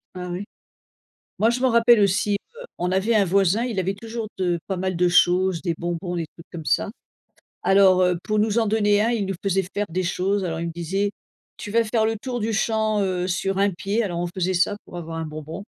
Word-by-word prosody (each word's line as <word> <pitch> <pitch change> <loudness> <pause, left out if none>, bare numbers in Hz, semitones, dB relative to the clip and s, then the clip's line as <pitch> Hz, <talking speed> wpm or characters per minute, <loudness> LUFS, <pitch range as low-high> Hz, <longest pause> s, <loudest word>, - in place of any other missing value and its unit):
Ah 180 0 -5
oui? 180 +3 -4 1.0
Moi 225 - +4
je 245 +1 -2
m'en 260 - +3
rappelle 235 -1 +5
aussi, 200 +1 +2 0.2
heu, - - -9
on 180 +1 -1
avait 195 +5 +1
un 205 -2 +4
voisin, 195 +4 +2
il 225 -6 -1
avait 190 +2 -1
toujours 225 +1 -6
de 175 -2 0
pas 190 - -2
mal 185 0 -2
de 180 +1 +3
choses, 180 0 +3
des 170 -3 -1
bonbons, 175 +1 -3
des 165 - -2
trucs 165 +2 -17
comme 165 -3 -7
ça - - +1 0.7
alors, 190 -1 +5
heu, 180 -1 +2
pour 215 0 +1
nous 215 +1 +1
en 225 - +2
donner 205 -1 +3
1 230 - +2
il 225 -4 0
nous 195 - -3
faisait 195 -1 +1
faire 205 0 -1
des 180 +3 -2
choses 190 +3 0
alors, 165 -2 -3
il 170 - -3
me 165 - -4
disait: 190 +5 -1 0.5
«Tu 205 - -7
vas 230 +2 +3
faire 220 0 +1
le 225 0 0
tour 245 -1 -4
du 220 +1 -1
champ, 220 -1 +1
heu, 185 -1 -1
sur 190 +1 -1
un 200 +1 +3
pied», 200 +5 -1
alors, 175 -5 -3
on 175 - -1
faisait 185 0 0
ça 185 +3 +2
pour - - -11
avoir 165 -1 -6
un 160 - -3
bonbon. 155 +4 -7
195 Hz, 235 wpm, -23 LUFS, 180-215 Hz, 1.0 s, rappelle